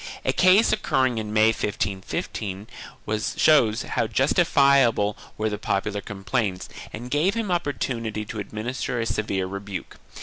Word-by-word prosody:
A -, -, +2 dB
case 185 Hz, +4 st, +5 dB
occur 130 Hz, -, +1 dB
ring 125 Hz, -3 st, +1 dB
in 105 Hz, -1 st, -5 dB
May, 110 Hz, +1 st, +5 dB
1515, 100 Hz, -1 st, -3 dB, 0.7 s
shows 125 Hz, -7 st, +4 dB
how 115 Hz, -, -1 dB
justifiable 135 Hz, -, +3 dB, 0.2 s
were 110 Hz, -, 0 dB
the 105 Hz, -1 st, -3 dB
popular 100 Hz, +1 st, -1 dB
com 100 Hz, -1 st, -9 dB
plaints 100 Hz, -4 st, -1 dB, 0.2 s
and 120 Hz, +3 st, -8 dB
gave 170 Hz, +8 st, +2 dB
him 225 Hz, -4 st, -2 dB
opportunity 115 Hz, -10 st, -2 dB
to 110 Hz, +1 st, -6 dB
administer 115 Hz, +4 st, -3 dB
a 115 Hz, -, 0 dB
severe 105 Hz, -3 st, -1 dB
rebuke. 100 Hz, 0 st, -6 dB
110 Hz, 140 wpm, -24 LUFS, 105-130 Hz, 0.7 s, case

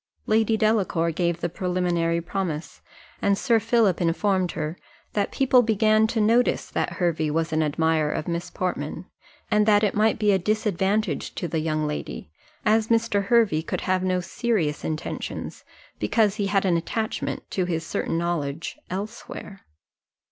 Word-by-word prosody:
Lady 220 Hz, 0 st, +2 dB
Delacour 200 Hz, -7 st, +1 dB
gave 170 Hz, 0 st, -1 dB
the 175 Hz, -, 0 dB
preliminary 175 Hz, -1 st, 0 dB
promise, 170 Hz, -3 st, -4 dB, 0.4 s
and 200 Hz, -1 st, +2 dB
Sir 230 Hz, -1 st, +3 dB
Philip 220 Hz, -4 st, +2 dB
informed 180 Hz, +1 st, +1 dB
her, 155 Hz, +2 st, -3 dB, 0.4 s
that 205 Hz, -1 st, 0 dB
people 260 Hz, -2 st, +4 dB
began 220 Hz, -1 st, +3 dB
to 225 Hz, -, -5 dB
take -, -, +3 dB
notice 235 Hz, +3 st, +2 dB
that -, -, -1 dB
Hervey 165 Hz, -3 st, 0 dB
was 160 Hz, +1 st, -1 dB
an 155 Hz, -, +2 dB
admirer 155 Hz, 0 st, +1 dB
of -, -, -3 dB
Miss 170 Hz, 0 st, -3 dB
Portman, 170 Hz, -2 st, -3 dB, 0.5 s
and 210 Hz, 0 st, +3 dB
that 205 Hz, 0 st, +5 dB
it 205 Hz, -, +2 dB
might 215 Hz, +1 st, +2 dB
be 210 Hz, -1 st, +3 dB
a 190 Hz, -, +3 dB
disadvantage 210 Hz, +1 st, 0 dB
to 175 Hz, -, -3 dB
the 165 Hz, -1 st, -1 dB
young 155 Hz, -1 st, -1 dB
lady, 150 Hz, -, -5 dB, 0.3 s
as 220 Hz, +1 st, +3 dB
Mr. 225 Hz, -3 st, +1 dB
Hervey 215 Hz, -8 st, +3 dB
could -, -, -4 dB
have 185 Hz, 0 st, +1 dB
no 185 Hz, -1 st, +1 dB
serious 180 Hz, -7 st, -1 dB
intentions, 155 Hz, -1 st, -5 dB, 0.4 s
because 215 Hz, -3 st, +2 dB
he 200 Hz, -2 st, 0 dB
had 195 Hz, 0 st, +1 dB
an 175 Hz, -3 st, +3 dB
attachment, 220 Hz, +6 st, -3 dB
to 185 Hz, -, 0 dB
his 165 Hz, -2 st, -2 dB
certain 165 Hz, -, -2 dB
knowledge, 165 Hz, -3 st, -2 dB
elsewhere. 200 Hz, 0 st, -7 dB
185 Hz, 160 wpm, -25 LUFS, 165-215 Hz, 0.5 s, that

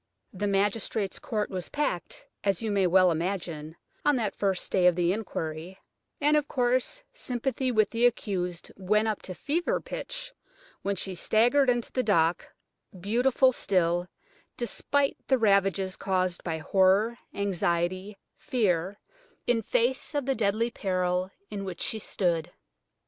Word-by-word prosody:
The 205 Hz, +2 st, -2 dB
magistrate's 200 Hz, +1 st, 0 dB
court 215 Hz, -3 st, -2 dB
was 185 Hz, -2 st, -4 dB
packed, 235 Hz, -, -3 dB, 0.2 s
as 195 Hz, +2 st, +1 dB
you 220 Hz, -, -1 dB
may 195 Hz, -2 st, +3 dB
well 185 Hz, 0 st, +5 dB
imagine, 165 Hz, -2 st, -3 dB, 0.3 s
on 295 Hz, -, +4 dB
that 225 Hz, -5 st, -1 dB
first 195 Hz, -3 st, 0 dB
day 180 Hz, -2 st, +4 dB
of 180 Hz, -, +5 dB
the 175 Hz, 0 st, +2 dB
inquiry; 175 Hz, -4 st, -5 dB, 0.4 s
and, 295 Hz, +1 st, +3 dB
of 295 Hz, -1 st, +2 dB
course, 255 Hz, -, 0 dB
sympathy 260 Hz, -, -2 dB
with 215 Hz, -3 st, +2 dB
the 235 Hz, +1 st, +4 dB
accused 180 Hz, -7 st, -3 dB
went 210 Hz, +3 st, +1 dB
up 215 Hz, -2 st, -1 dB
to 185 Hz, -, -7 dB
fever 315 Hz, -, 0 dB
pitch -, -, -6 dB, 0.5 s
when 200 Hz, 0 st, -1 dB
she 190 Hz, +1 st, -4 dB
staggered 245 Hz, +9 st, +3 dB
into 240 Hz, -1 st, 0 dB
the 255 Hz, -, +1 dB
dock, 170 Hz, -7 st, +2 dB, 0.5 s
beautiful 245 Hz, +7 st, +3 dB
still, 175 Hz, -6 st, +1 dB, 0.5 s
despite 275 Hz, +3 st, 0 dB
the 265 Hz, -, +4 dB
ravages 195 Hz, -3 st, +2 dB
caused 185 Hz, -2 st, -1 dB
by 165 Hz, -2 st, -2 dB
horror, 195 Hz, +7 st, +3 dB, 0.2 s
anxiety, 185 Hz, 0 st, -1 dB, 0.2 s
fear, 195 Hz, -5 st, 0 dB, 0.5 s
in 240 Hz, -2 st, +2 dB
face 250 Hz, +7 st, 0 dB
of 285 Hz, -3 st, 0 dB
the 270 Hz, -, +2 dB
deadly 225 Hz, +1 st, +1 dB
peril 185 Hz, -3 st, -1 dB, 0.2 s
in 200 Hz, -1 st, -4 dB
which 185 Hz, -3 st, -6 dB
she 220 Hz, -, -1 dB
stood. 175 Hz, -6 st, -1 dB
200 Hz, 145 wpm, -28 LUFS, 180-240 Hz, 0.5 s, well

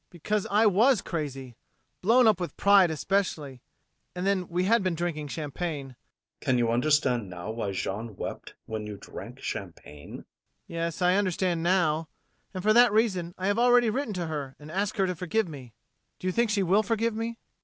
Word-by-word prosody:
MAURICE. -, -, -49 dB
Because 205 Hz, +4 st, -2 dB
I 210 Hz, +3 st, +4 dB
was 220 Hz, +4 st, +4 dB
crazy 135 Hz, -7 st, -5 dB, 0.5 s
blown 240 Hz, +6 st, +5 dB
up 215 Hz, -5 st, +4 dB
with 175 Hz, -, -5 dB
pride 200 Hz, -3 st, +6 dB
especially 155 Hz, -6 st, -2 dB, 0.5 s
and 180 Hz, +1 st, -3 dB
then 195 Hz, -3 st, +1 dB
we 180 Hz, +1 st, -1 dB
had 225 Hz, +4 st, +3 dB
been 185 Hz, -3 st, 0 dB
drinking 160 Hz, -3 st, -3 dB
champagne 150 Hz, -1 st, -4 dB
ADOLPHE. 125 Hz, -, -17 dB, 0.4 s
Can 130 Hz, -, +1 dB
you 120 Hz, -1 st, +1 dB
understand 125 Hz, -4 st, +2 dB
now 90 Hz, +4 st, -6 dB
why 110 Hz, -3 st, -3 dB
Jeanne 100 Hz, +3 st, -4 dB
wept -, -, -7 dB
when 110 Hz, -1 st, -5 dB
you 105 Hz, -1 st, -7 dB
drank -, -, -10 dB
champagne? 75 Hz, 0 st, -7 dB
MAURICE. -, -, -9 dB, 0.4 s
Yes, 170 Hz, 0 st, -4 dB
I 180 Hz, +2 st, +4 dB
understand 185 Hz, -3 st, 0 dB
now 165 Hz, -3 st, +1 dB, 0.4 s
And 185 Hz, -2 st, -6 dB
for 215 Hz, +1 st, +4 dB
that 240 Hz, 0 st, +6 dB
reason 190 Hz, -6 st, +1 dB
I 185 Hz, -, -4 dB
have 205 Hz, +3 st, +1 dB
already 245 Hz, -1 st, +5 dB
written 245 Hz, -3 st, -2 dB
to 175 Hz, -1 st, -2 dB
her 145 Hz, -4 st, -5 dB
and 150 Hz, +1 st, -11 dB
asked 200 Hz, +5 st, -2 dB
her 195 Hz, -, +3 dB
to 180 Hz, -, -1 dB
forgive 185 Hz, +5 st, -1 dB
me 130 Hz, -8 st, -10 dB, 0.4 s
Do -, -, -10 dB
you 185 Hz, -, +1 dB
think 235 Hz, +2 st, +2 dB
she 205 Hz, -2 st, +1 dB
will 190 Hz, +4 st, +4 dB
forgive 225 Hz, +2 st, 0 dB
me? 225 Hz, +1 st, -2 dB
ADOLPHE. 230 Hz, 0 st, -8 dB
180 Hz, 195 wpm, -27 LUFS, 145-205 Hz, 0.5 s, pride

